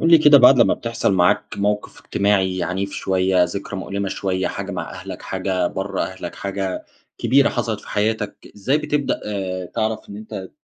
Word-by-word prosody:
قل 165 - +3
لي 165 - +9
كده 150 -1 +8
بعد 130 +1 +7
لمّا - - +5
بتحصل 115 -3 -1
معاك 90 -1 +2
موقف 105 +1 -1
اجتماعي 95 -2 +1
عنيف 95 +2 -2
شويّة، 95 -2 +2
ذكرى 100 +3 -5
مؤلمة 100 +1 -3
شويّة 95 -1 -1
حاجة - - -5
مع - - -4
أهلك، - - -8
حاجة 95 -1 -1
برّه 95 +2 -2
أهلك، 95 -2 -6
حاجة 100 -1 -3 0.3
كبيرة 140 +1 +4
حصلت 115 -4 -2
في - - -15
حياتك 105 0 -2
إزاي 130 +9 +1
بتبدأ 150 -2 -1
آآ، 95 -3 -3
تعرف 110 +4 -2
إن 100 - -8
أنت 105 -3 -7
100 Hz, 175 wpm, -21 LUFS, 95-110 Hz, 0.3 s, لي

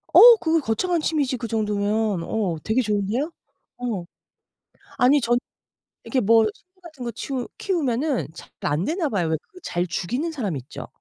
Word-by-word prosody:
어 475 0 +10
그거 325 -4 +2
거창한 320 +7 0
취미지 285 -5 0
그 235 -1 -5
정도면. 210 -3 0
어 190 -6 -1
되게 220 +4 +2
좋은데요? 215 - -1 0.5
어. 230 -8 -3 0.9
아니 275 +4 +5
저는 240 0 +2 0.6
이렇게 265 - 0
뭐 225 0 +5
식물 370 +1 -29
같은 310 -7 -10
거 235 - -2
치우 250 +2 -4
키우면은 290 -6 0
잘 - - -11
안 150 +5 0
되나 325 - 0
봐요. 185 -8 0
왜 160 - +1 0.2
그 365 - -14
잘 175 +1 -1
죽이는 245 - -2
사람 215 - -3
있죠. 130 +1 -8
240 Hz, 305 characters per minute, -23 LUFS, 205-300 Hz, 0.9 s, 어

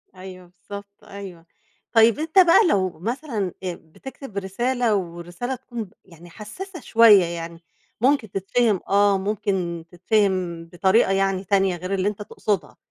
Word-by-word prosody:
أيوه، 185 -1 -11
بالضبط 200 +2 -11
أيوه. 190 -4 -10 0.5
طيب 225 +3 +5
أنت 320 +4 +2
بقى 365 +3 +6
لو 185 - 0
مثلًا 230 - -3
أ 180 -1 -2
بتكتب 220 - -11
رسالة 235 +4 0
والرسالة 175 +7 -4
تكون 235 -1 -7
ب 185 - -16
يعني 175 -1 -15
حسّاسة 335 - -9
شوية، 225 -6 +6
يعني 170 0 -7 0.4
ممكن 255 -5 +2
تتفهم 205 +1 +1
آه 200 0 +4
ممكن 190 -4 -2
تتفهم 185 -3 0
بطريقة 190 +5 +2
يعني 195 0 +1
تانية 195 -1 +1
غير 185 +3 -5
اللي 190 0 0
أنت 210 0 -3
تقصدها، 205 -3 -3
195 Hz, 140 wpm, -23 LUFS, 180-225 Hz, 0.5 s, بقى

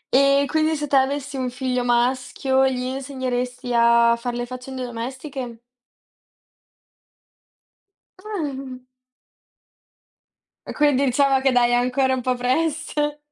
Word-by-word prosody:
E 275 +1 +4
quindi 315 +1 +1
se 295 0 -3
tu 280 - -14
avessi 275 +1 +1
un 255 -1 -2
figlio 250 0 -2
maschio, 255 +2 +1
gli 250 -1 -2
insegneresti 255 -2 -4
a 235 0 +5
fare 240 0 -4
le 240 - -2
faccende 255 +1 -7
domestiche? 245 +1 -6 2.6
Ah. 275 -11 -6 1.8
E - - -6
quindi 290 -2 +2
diciamo 270 +1 +2
che 270 -1 +3
dai, 245 -1 +3
è - - +2
ancora 255 +2 +2
un 260 - -1
po' 255 0 0
presto. 295 +3 -1
260 Hz, 115 wpm, -22 LUFS, 250-275 Hz, 2.6 s, a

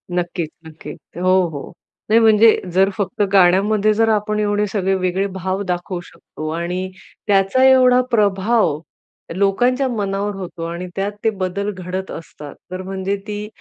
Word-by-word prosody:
नक्कीच, 175 -2 -2 0.2
नक्की. 160 0 -10 0.3
हो, 185 0 +3
हो. 145 -3 -8 0.4
नाही 225 +2 +5
म्हणजे 220 0 +5
जर 190 +2 +4
फक्त 200 0 -2
गाण्यामध्ये 200 +3 +4
जर 225 +1 +2
आपण 210 0 0
एवढे 205 0 +1
सगळे 195 -2 0
वेगळे 185 +1 0
भाव 190 +2 -2
दाखवू 180 0 -3
शकतो 155 -2 -10
आणि 180 +2 -3 0.4
त्याचा 195 +5 +3
एवढा 255 -1 +6
प्रभाव 205 -5 +2 0.6
लोकांच्या 245 +8 +2
मनावर 205 -2 -2
होतो 180 -3 -7
आणि 170 +2 -5
त्यात 195 +1 -1
ते 225 - +3
बदल 200 0 -3
घडत 185 0 -6
असतात. 150 -3 -9 0.2
तर 185 0 -4
म्हणजे 190 +1 -3
ती 210 0 -4
195 Hz, 145 wpm, -19 LUFS, 185-210 Hz, 0.6 s, एवढा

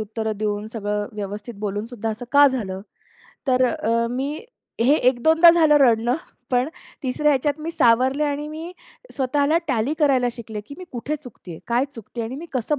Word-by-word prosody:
उत्तर 220 +1 -3
देऊन 210 0 -2
सगळं 210 -2 -2
व्यवस्थित 205 +3 -6
बोलूनसुद्धा 215 +2 -3
असं 225 +3 -6
का 285 0 +8
झालं?" 205 -8 -2 0.7
तर 255 -1 +3
अ, 230 -1 0
मी 275 +5 -3 0.4
हे 255 +5 +5
एक 250 -4 +2
दोनदा 325 +3 +7
झालं 320 -3 +5
रडणं. 240 -1 +3 0.3
पण 250 +2 +2 0.3
3ऱ्या 290 +3 +1
ह्याच्यात 285 +1 +1
मी 325 - -4
सावरले 260 +1 +3
आणि 290 0 -2
मी 320 +3 -7 0.4
स्वतःला 285 +3 +1
टॅली 260 +2 0
करायला 265 -5 +3
शिकले, 220 -3 -7
की 250 +7 -11
मी 365 - -8
कुठे 255 +5 -3
चुकतेय 180 - -11
काय 240 +2 +2
चुकतेय? 230 +1 -6
आणि 245 +4 -5
मी 330 +4 -8
कसं 265 +3 -1
250 Hz, 170 wpm, -22 LUFS, 220-285 Hz, 0.7 s, का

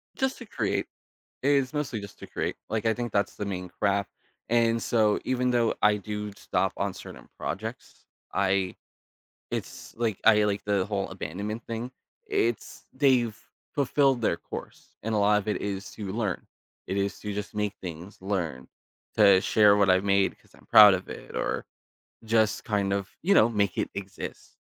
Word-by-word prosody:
Just 265 0 0
to 235 - -8
create. 110 - -1 0.6
It 140 - +2
is 140 0 +2
mostly 140 -7 -2
just 100 0 -10
to - - -9
create. - - -3
Like, 110 +1 -2
I 110 - +4
think 120 -1 -4
that's 100 0 0
the 105 - -4
main 90 -2 -4
craft, 100 +1 0 0.4
and 115 -1 +3
so 110 -3 +2
even 125 -1 +1
though 120 -2 +2
I 105 0 +5
do 105 0 -5
stop - - 0
on - - -1
certain - - -11
projects, - - -6 0.3
I 95 -1 +1 0.8
it's - - -6
like, 115 -4 -1
I 105 -1 +6
like 100 -1 -1
the 100 -2 +1
whole 100 -2 -2
abandonment 100 +5 -5
thing. 115 +2 -4 0.4
I - - -3 0.2
it's - - -14
they've 125 -5 +3 0.4
fulfilled 135 -2 +2
their - - +2
course, - - -9
and 110 +1 -1
a 105 - +2
lot 105 +1 +4
of 105 +1 -5
it 105 - 0
is 100 -1 -4
to 100 -3 -6
learn. 105 -5 -2 0.4
It 95 - -2
is 100 -2 -1
to 105 -1 -4
just 105 0 -5
make 105 -1 -1
things, 90 +3 -7
learn, 85 -10 -2 0.5
to 100 -3 +7
share 105 0 +5
what 100 -2 +4
I've 95 +1 +4
made, 100 -1 +2
'cause - - -27
I'm - - -20
proud 105 -2 +9
of 90 - -4
it, - - -9
or - - -1 0.6
just 110 -1 +2
kind 100 -2 0
of, 100 -1 -1
you 200 +3 +4
know, 115 - +6
make 100 -4 0
it - - 0
exist. 100 -1 -7
105 Hz, 180 wpm, -27 LUFS, 100-115 Hz, 0.8 s, proud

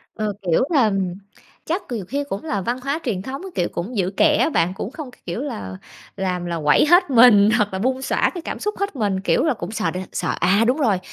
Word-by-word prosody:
Ờ, 215 -2 -2
kiểu 180 +3 +2
là, 235 -7 +4 0.7
chắc 350 +5 -1
nhiều 215 -6 -3
khi 285 +7 -2
cũng 195 - -4
là 205 -11 -2
văn 240 +6 -2
hóa 280 +4 -1
truyền 200 -7 -2
thống, 265 - -6
kiểu, 175 - +1
cũng 205 +8 -5
giữ 185 -1 +1
kẽ 305 -2 +5
á - - +2
bạn, 180 - +1
cũng 195 - -6
không 295 -4 -8
cái - - -22
kiểu 175 +8 -4
là, 95 - -5 0.4
làm 180 -2 -2
là 170 -1 -3
quẩy 150 - +5
hết 350 +1 +5
mình 230 -5 +7
hoặc 205 -2 0
là 190 - -2
bung 260 +4 0
xõa - - +1
cái 350 - -4
cảm - - -6
xúc 420 0 -3
hết 400 -6 -2
mình, 205 -5 0
kiểu - - +2
là, 310 -4 +2
cũng 190 -2 -7
sợ 175 -6 -1
đ 180 - -5 0.2
sợ, - - -1
à, 200 +4 +3
đúng 255 +4 +2
rồi, 225 -10 +2
220 Hz, 250 wpm, -21 LUFS, 190-275 Hz, 0.7 s, mình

